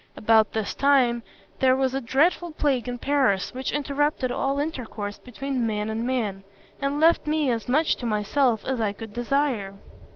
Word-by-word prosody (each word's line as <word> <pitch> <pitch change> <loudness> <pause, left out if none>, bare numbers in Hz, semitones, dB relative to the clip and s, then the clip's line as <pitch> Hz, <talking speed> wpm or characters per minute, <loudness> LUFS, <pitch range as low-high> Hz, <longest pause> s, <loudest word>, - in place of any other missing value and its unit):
About 220 0 +3
this 220 -2 -2
time, 260 -4 +3 0.4
there 260 -1 +4
was 265 -1 0
a 270 - -1
dreadful 310 +8 +1
plague 275 -5 0
in 245 - -4
Paris, 260 -8 +1
which 260 +1 -3
interrupted 290 -2 0
all 275 +2 -1
intercourse 235 -9 -4
between 255 -1 -3
man 210 0 -2
and 225 +2 -2
man, 215 -7 -2 0.4
and 280 +1 -1
left 325 0 +4
me 300 -3 +1
as 230 0 -3
much 305 +5 +2
to 245 - -4
myself 220 +2 +1
as 260 -3 -1
I 205 -2 0
could 220 0 -9
desire. 240 -5 -1
255 Hz, 170 wpm, -25 LUFS, 220-280 Hz, 0.4 s, there